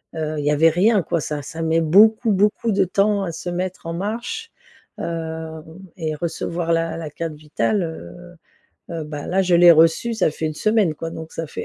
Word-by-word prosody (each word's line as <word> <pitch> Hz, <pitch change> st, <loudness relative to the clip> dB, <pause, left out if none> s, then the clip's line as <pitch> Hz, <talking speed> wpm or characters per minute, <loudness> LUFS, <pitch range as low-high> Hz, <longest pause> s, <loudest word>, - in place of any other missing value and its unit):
heu, 155 Hz, -1 st, -3 dB
il 145 Hz, -, -4 dB
y 150 Hz, -, +3 dB
avait 160 Hz, +2 st, +5 dB
rien, 195 Hz, +5 st, +3 dB
quoi, -, -, -1 dB
ça 150 Hz, 0 st, -4 dB
ça 160 Hz, +4 st, -7 dB
met 165 Hz, 0 st, +1 dB
beaucoup, 215 Hz, +7 st, +5 dB
beaucoup 210 Hz, +3 st, +1 dB
de 195 Hz, -1 st, +2 dB
temps 200 Hz, +2 st, +1 dB
à 170 Hz, -, -3 dB
se 175 Hz, -, -6 dB
mettre 180 Hz, 0 st, -4 dB
en 165 Hz, -, -3 dB
marche, 235 Hz, -, -4 dB, 0.5 s
hem, 160 Hz, -1 st, -5 dB, 0.3 s
et 155 Hz, -3 st, -3 dB
recevoir 170 Hz, +1 st, -3 dB
la 165 Hz, 0 st, -1 dB
la 160 Hz, -2 st, -6 dB
carte 165 Hz, +1 st, -5 dB
vitale, 155 Hz, +7 st, -1 dB
heu. 175 Hz, +2 st, -9 dB, 0.6 s
Heu, 165 Hz, -, -3 dB
bah 150 Hz, -1 st, -7 dB
là, 190 Hz, +2 st, +1 dB
je 180 Hz, -1 st, +2 dB
l'ai 175 Hz, 0 st, +8 dB
reçue, 165 Hz, +9 st, +3 dB
ça 190 Hz, -, +2 dB
fait 155 Hz, +1 st, -4 dB
1 155 Hz, -, -3 dB
semaine, 215 Hz, -4 st, +1 dB
quoi 165 Hz, +2 st, -6 dB
donc, 160 Hz, 0 st, -8 dB
ça 165 Hz, -, -4 dB
fait -, -, -6 dB
165 Hz, 205 wpm, -21 LUFS, 160-195 Hz, 0.6 s, l'ai